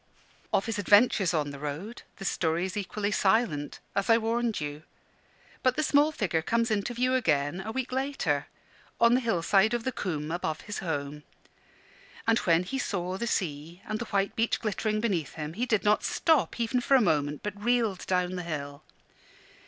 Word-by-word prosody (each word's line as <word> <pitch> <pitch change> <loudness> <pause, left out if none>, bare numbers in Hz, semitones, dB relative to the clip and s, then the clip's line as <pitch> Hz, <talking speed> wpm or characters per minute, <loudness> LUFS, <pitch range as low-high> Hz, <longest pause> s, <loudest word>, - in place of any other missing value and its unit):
Of 195 - +2
his 225 -2 -2
adventures 205 -2 +4
on 150 -4 -1
the 140 - -9
road 150 - -5 0.2
the 195 - -7
story 165 0 0
is 190 +2 -5
equally 205 +1 -2
silent, 190 -9 +1
as 200 +2 -1
I 225 - +7
warned 230 0 0
you. 145 0 -5 0.8
But 255 -1 +2
the 310 - 0
small 295 +1 +4
figure 185 - -1
comes 230 +6 0
into 215 +3 -1
view 255 +2 +1
again, 160 - +1
a 215 +3 -5
week 260 +1 -3
later, 260 - -1 0.5
on 235 0 +5
the 250 - +4
hillside 215 0 +2
of 235 - -3
the 260 - -1
coombe 160 -9 -3
above 165 -2 -2
his 205 - -6
home. 150 -4 -3 1.0
And 225 +1 +3
when 170 -1 +3
he 270 +9 -4
saw 185 -4 -2
the 235 - -2
sea 165 -2 -3
and 215 0 -3
the 235 - -3
white 200 -2 -1
beach 230 +1 +1
glittering 215 0 -1
beneath 180 - -1
him, 155 -1 -5
he 240 +7 -2
did 215 -5 +1
not 210 0 +3
stop, 320 -6 +1
even 235 +2 +1
for 275 - +3
a - - +7
moment, 150 -6 0
but 205 0 -5
reeled 230 -5 +1
down 180 0 0
the - - -3
hill. 145 -4 -5
200 Hz, 185 wpm, -28 LUFS, 165-230 Hz, 1.0 s, I